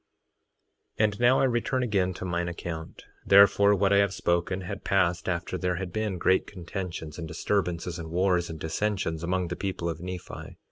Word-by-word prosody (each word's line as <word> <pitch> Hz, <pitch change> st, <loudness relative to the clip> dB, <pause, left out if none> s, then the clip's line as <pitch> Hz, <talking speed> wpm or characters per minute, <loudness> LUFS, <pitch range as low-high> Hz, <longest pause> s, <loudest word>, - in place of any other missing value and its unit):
3:17 -, -, +2 dB
And 105 Hz, -1 st, -2 dB
now 120 Hz, +2 st, +5 dB
I -, -, +3 dB
return 130 Hz, +1 st, +1 dB
again 100 Hz, -6 st, +1 dB
to -, -, -6 dB
mine 85 Hz, -1 st, -1 dB
account; 85 Hz, -2 st, -6 dB, 0.2 s
therefore, 100 Hz, +1 st, +6 dB
what 100 Hz, 0 st, +2 dB
I -, -, +5 dB
have 100 Hz, -1 st, +2 dB
spoken 85 Hz, +2 st, 0 dB
had 100 Hz, +2 st, -6 dB
passed 90 Hz, -1 st, +1 dB
after 90 Hz, +1 st, -2 dB
there 90 Hz, -1 st, 0 dB
had 90 Hz, -1 st, -5 dB
been 110 Hz, -3 st, -1 dB
great 95 Hz, +2 st, +2 dB
contentions, 90 Hz, -4 st, -6 dB
and 80 Hz, -, -5 dB
disturbances, 90 Hz, 0 st, -2 dB
and 80 Hz, -1 st, -6 dB
wars, 90 Hz, 0 st, +1 dB
and 80 Hz, -1 st, -7 dB
dissensions, 80 Hz, 0 st, -2 dB
among 90 Hz, 0 st, -1 dB
the 90 Hz, -, -3 dB
people 95 Hz, -3 st, -3 dB
of 80 Hz, -1 st, -3 dB
Nephi. 90 Hz, 0 st, -7 dB
90 Hz, 185 wpm, -27 LUFS, 85-100 Hz, 0.2 s, therefore